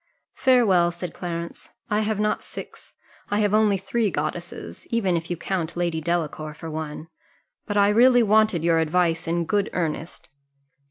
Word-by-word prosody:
"Farewell," 215 -10 +4
said 175 0 -6
Clarence: 170 -1 -6 0.2
"I 210 - +2
have 215 -1 -1
not 210 0 0
six, - - -10 0.3
I 205 - 0
have 205 -1 +1
only 215 -2 +4
three 210 +3 0
goddesses; 175 -1 -5
even 200 -6 +1
if 165 0 -3
you 175 - -2
count 170 -2 -3
Lady 170 -2 -1
Delacour 155 -2 -2
for 160 +1 -8
one. 155 0 -5 0.6
But 205 - -1
I 200 0 +5
really 245 +3 +5
wanted 215 -5 +3
your 165 -1 +3
advice 165 +1 +1
in 170 0 0
good 205 +4 0
earnest." 165 -1 -3
175 Hz, 160 wpm, -24 LUFS, 165-210 Hz, 0.6 s, I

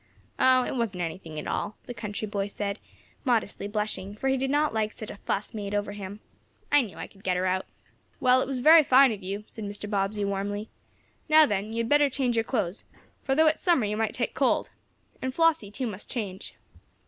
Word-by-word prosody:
"Oh, 255 0 +5
it - - -3
wasn't 210 -7 -1
anything 160 -1 -6
at 150 - -4
all," 210 - -3
the 245 - -6
country 210 -1 -5
boy 200 -1 -2
said, 205 0 -4 0.4
modestly 225 -5 0
blushing, 205 -2 -3
for 270 +5 -1
he 265 - +3
did 265 0 -1
not 295 0 +2
like 215 -1 0
such 215 - -6
a - - -10
"fuss" 200 0 -3
made 205 -2 -4
over 205 0 -1
him. 205 0 -8 0.5
"I 290 - +6
knew 220 -7 -7
I - - -5
could 195 0 -19
get 180 -1 +1
her 185 - 0
out." 185 0 0 0.5
"Well, 255 -2 +4
it - - -2
was 260 -2 -2
very 315 +3 +8
fine 265 -1 +6
of 210 -2 -5
you," 195 +3 -4
said 220 - -9
Mr. 205 +1 -5
Bobbsey, 205 0 -1
warmly. 205 +2 -3 0.6
"Now 310 0 +8
then, 205 -3 -2
you 225 - -5
had 230 - -4
better 290 -1 +5
change 250 -3 0
your 225 - +2
clothes, 200 -7 -2 0.4
for, 270 - +1
though 315 +2 +5
it 310 0 +4
is - - -16
summer, 340 - +3
you 210 +1 -1
might 220 0 -1
take 235 - -2
cold. 265 -2 +1 0.5
And 260 0 -3
Flossie, 325 -10 +3
too, 255 +5 -4
must 210 -4 -6
change." 200 -6 -5
215 Hz, 220 wpm, -27 LUFS, 200-260 Hz, 0.6 s, very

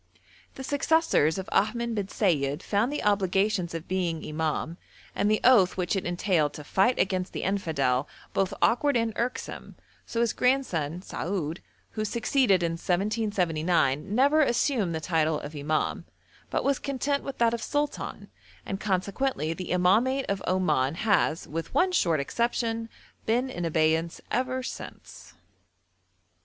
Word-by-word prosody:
The 265 - -7
successors 285 - +2
of 190 - -5
Ahmed 235 +2 +1
bin 205 -3 -2
Sayid 150 -7 0
found 215 +6 +1
the 295 - -3
obligations 195 -3 +1
of 165 0 -6
being 175 -3 -1
imam, 160 +1 -2 0.4
and 205 - +1
the 215 - +3
oath 215 -9 +5
which 180 +1 0
it 190 - -2
entailed 175 -4 +1
to 150 - -8
fight 195 - +2
against 185 0 0
the - - -4
infidel, 145 -9 0 0.3
both 195 0 +1
awkward 250 +3 +3
and 230 -1 0
irksome, 245 +2 -4 0.3
so 230 - -1
his 235 -2 +1
grandson, 180 - 0
Saoud, 170 -4 -3 0.3
who 215 - -3
succeeded 220 -3 +2
in 170 - +1
1779, 175 - 0
never 285 +5 +4
assumed 240 - +1
the - - -2
title 160 -2 +1
of 150 +2 -8
imam, 150 +2 -1 0.4
but - - -1
was 275 -1 +1
content 280 +1 -1
with 275 - -6
that 235 -1 +3
of 235 - -3
sultan, 290 +4 -3 0.3
and 195 - -4
consequently 195 - -1
the 185 +2 -7
imamate 220 +10 +3
of 200 -1 -1
Oman 155 -7 +1
has, 185 -5 +1
with 165 +2 -5
one 370 +1 +3
short 170 - +2
exception, 230 - -1 0.4
been 245 +4 +1
in 175 -7 -4
abeyance 160 +1 +1
ever 255 +1 -1
since. 85 - -9
190 Hz, 145 wpm, -27 LUFS, 165-235 Hz, 0.4 s, oath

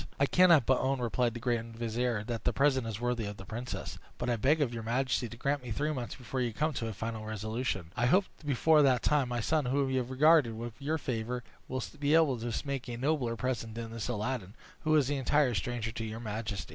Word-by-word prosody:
"I 140 - +5
cannot 170 -4 +6
but 130 - +3
own," 135 0 0
replied 120 0 0
the - - -4
grand 115 -1 -2
vizier, 115 -1 -1
"that 115 -1 -4
the - - +2
present 135 -4 +2
is 110 -2 -4
worthy 120 -2 -1
of 105 0 -6
the 95 - -10
princess; 120 +4 -5 0.2
but 120 0 -1
I - - +2
beg 140 +8 +3
of 135 -5 +1
your 115 - -4
majesty 125 +1 0
to 115 - -10
grant 140 +3 0
me 125 - -8
three 145 +7 -1
months 125 -4 -4
before 130 0 -4
you 120 -2 -1
come 155 +6 0
to 115 -3 -3
a - - -3
final 110 +2 -4
resolution. 110 -4 -3
I 120 0 +2
hope 190 +9 +4 0.2
before 150 +2 +4
that 130 -4 +3
time 145 -4 +2
my 120 -1 -1
son, 155 +4 +1
whom 135 +1 +1
you 130 - +2
have 125 -1 -4
regarded 135 -3 +4
with 115 0 -5
your 150 +3 -1
favor, 125 -3 -3 0.2
will 130 0 -3 0.2
be 145 +1 +3
able 150 -7 +4
to 120 +1 -3 0.2
make 135 -2 -3
a 120 - -4
nobler 130 -3 0
present 115 -2 -3
than 115 -1 -5
this 115 -2 -4
Aladdin, 110 -3 -3 0.2
who 155 0 +2
is 145 -2 +3
an 145 - 0
entire 135 0 +2
stranger 115 +1 -2
to 115 0 -5
your 110 0 -5
majesty." 105 -3 -4
125 Hz, 240 wpm, -31 LUFS, 115-140 Hz, 0.2 s, cannot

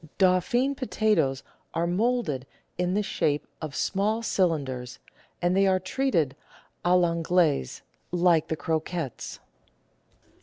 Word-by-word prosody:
Dauphine 195 +9 +3
potatoes 215 - +1 0.3
are 165 - +1
moulded 180 - 0 0.3
in 180 +1 0
the 210 - +1
shape 150 -6 0 0.2
of 155 -3 -5
small 215 +4 0
cylinders, 140 - -1 0.5
and 175 +1 +3
they 195 0 +4
are 190 -1 +3
treated 185 - 0 0.5
a 175 - +1
I' 180 -1 +4
Anglaise, 165 - +1 0.3
like 170 -2 +3
the 160 - -1
croquettes. 160 -4 -3
175 Hz, 115 wpm, -27 LUFS, 155-195 Hz, 0.5 s, they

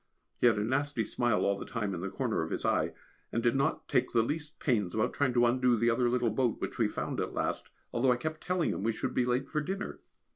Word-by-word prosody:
He - - +5
had 115 - +4
a 105 - +1
nasty 135 0 0
smile 120 -1 +1
all 100 0 +1
the - - -4
time 105 -6 -2
in 85 - -4
the 95 - -3
corner 115 +1 -1
of 80 - -3
his - - -3
eye, - - +1 0.4
and 115 - -1
did 120 0 +3
not 135 0 0
take 125 - +1
the 115 -2 +4
least 150 +4 -4
pains 105 - 0
about 110 +2 +1
trying 140 -3 +1
to 120 0 +5
undo 125 0 +3
the 115 +2 +3
other 120 +1 +2
little 120 -2 +1
boat 120 +1 0
which - - -4
we - - +4
found - - -3
at - - -3
last, - - -2 0.2
although 125 +2 +3
I 125 - +2
kept 155 +4 -4
telling 180 -2 +1
him - - -3
we 115 +2 +1
should 130 +3 -3
be 125 - +2
late 125 +2 0
for 150 - -1
dinner. 195 +6 -4
120 Hz, 260 wpm, -31 LUFS, 115-135 Hz, 0.4 s, He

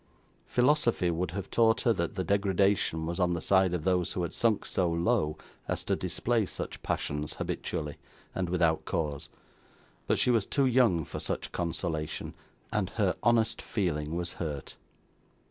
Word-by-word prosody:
Philosophy 125 - +3
would 85 +2 -1
have 100 +2 -5
taught 115 -1 +4
her 115 - +3
that 85 0 -2
the 95 - -1
degradation 100 -3 +2
was 85 +2 -3
on 90 -1 +2
the - - -2
side 95 0 +3
of 90 -3 -2
those 90 -2 +1
who 90 - -1
had 85 - -3
sunk 115 -3 +1
so 90 -2 0
low 85 -1 +1 0.3
as - - -2
to - - +1
display 120 -2 0
such 95 - -6
passions 75 +1 -2
habitually, 75 -3 -3 0.4
and 90 -2 -2
without 85 -3 +2
cause: 75 -1 -2 0.8
but - - +2
she 125 - +3
was 115 -5 +2
too 140 -2 +2
young 115 - +3
for - - -6
such - - -3
consolation, 80 -2 -3 0.4
and - - 0
her - - +1
honest 115 -1 +2
feeling 80 -6 -2
was 85 0 -2
hurt. 75 -5 -5
90 Hz, 165 wpm, -29 LUFS, 80-105 Hz, 0.8 s, taught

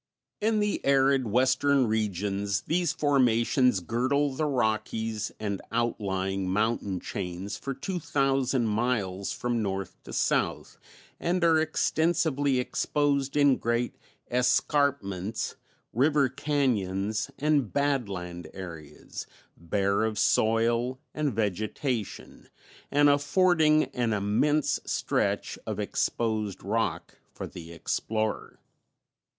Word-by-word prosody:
In 215 0 +1
the 210 -1 -1
arid 135 -2 +3
Western 130 +4 +3
regions 100 -2 -1
these 170 +5 0
formations 125 -6 +2
girdle 130 - 0
the 155 +3 -1
Rockies 110 -3 -1
and 100 -3 -3
outlying 95 -5 -1
mountain 105 -1 0
chains 95 0 -5
for 135 -1 -5
two 180 +7 -4
thousand 135 -4 +1
miles 105 -4 -1
from 120 -1 -1
north 95 -2 -4
to - - -9
south, - - -1 0.4
and 175 +1 0
are 165 -1 +5
extensively 155 -3 +1
exposed 140 +2 0
in 145 -2 +5
great 120 +1 -1 0.4
escarpments, 125 - +1 0.4
river 140 +2 +3
cañons 110 -7 -1
and 145 -6 +1
"badland" 100 - -2
areas, 85 -5 -8 0.3
bare 100 +5 0
of 110 -1 -1
soil 115 +4 +2
and 150 -2 0
vegetation 110 +3 -3 0.4
and 145 +1 +4
affording 155 +1 +4
an 120 -3 0
immense 110 +9 +1
stretch - - -1
of - - -3
exposed 110 -4 -1
rock 110 +4 -2
for - - -6
the 85 -1 -10
explorer. 110 +6 -2
120 Hz, 100 wpm, -28 LUFS, 100-140 Hz, 0.4 s, are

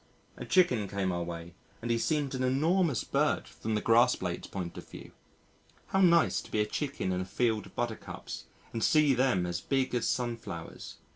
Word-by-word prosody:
A - - -7
chicken 125 - +3
came 95 -1 -1
our 85 -1 -2
way 85 0 -6 0.3
and 120 +1 -2
he 115 - +2
seemed 145 0 0
an 130 -1 -1
enormous 155 - +2
bird - - +1
from 110 0 -4
the 105 - 0
grass 120 +2 +5
blade's 90 -2 -4
point 90 -3 -5
of - - -10
view. - - -10 0.8
How 195 - +2
nice 170 -2 +4
to - - -13
be 110 - -1
a 105 - +3
chicken 135 -3 -2
in 90 0 -1
a - - -3
field 110 +2 0
of - - -19
Buttercups 120 -2 -5 0.3
and 115 - -2
see 155 -3 +5
them 125 -8 +2
as 85 +1 -3
big 135 -2 0
as 120 -2 +1
Sunflowers! 120 -2 -4
115 Hz, 195 wpm, -30 LUFS, 95-135 Hz, 0.8 s, grass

